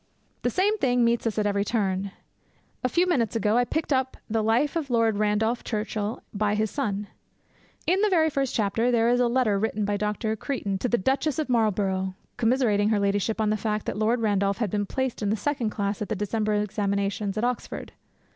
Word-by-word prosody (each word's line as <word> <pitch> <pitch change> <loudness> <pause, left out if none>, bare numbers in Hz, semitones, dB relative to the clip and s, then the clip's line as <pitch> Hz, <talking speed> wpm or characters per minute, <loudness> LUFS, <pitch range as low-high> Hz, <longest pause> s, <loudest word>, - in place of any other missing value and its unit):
The - - +1
same 415 +3 +1
thing 245 -2 +3
meets 235 0 +1
us 220 - -2
at 210 - +1
every 200 -1 +1
turn. 200 -3 -1 0.7
A 255 - +2
few 345 +7 +3
minutes 245 -12 +1
ago 215 -1 +2
I 245 0 +3
picked 315 +2 -1
up 260 0 0
the 225 0 0
Life 230 +8 +2
of 315 -5 -2
Lord 230 -3 +2
Randolph 215 +3 +1
Churchill, 215 -1 -3
by 210 0 +1
his 215 0 0
son. 210 -8 -2 0.8
In 370 +3 +2
the 425 - +3
very 320 -4 +3
first 275 -2 -1
chapter 225 +3 +1
there 235 -1 +3
is 245 0 +3
a 245 - +4
letter 235 -5 +2
written 215 0 -1
by 205 0 0
Dr. 210 +2 -1
Creighton 205 -5 -3
to 250 - -1
the 240 - +3
Duchess 270 - 0
of 310 -4 -2
Marlborough 195 -5 +1 0.2
commiserating 225 -4 +2
her 215 -2 +2
ladyship 200 +2 0
on 215 -1 +2
the 215 - +1
fact 215 0 -2
that - - -2
Lord 225 +3 +1
Randolph 200 -2 +1
had 220 -5 -1
been 205 -1 -1
placed 260 0 -2
in 205 - 0
the 215 - +2
second 255 -2 -1
class 200 -1 -2
at 210 - -3
the - - 0
December 210 +1 -1
examinations 200 0 -1
at 215 - -1
Oxford. 245 0 -3
220 Hz, 210 wpm, -26 LUFS, 205-245 Hz, 0.8 s, a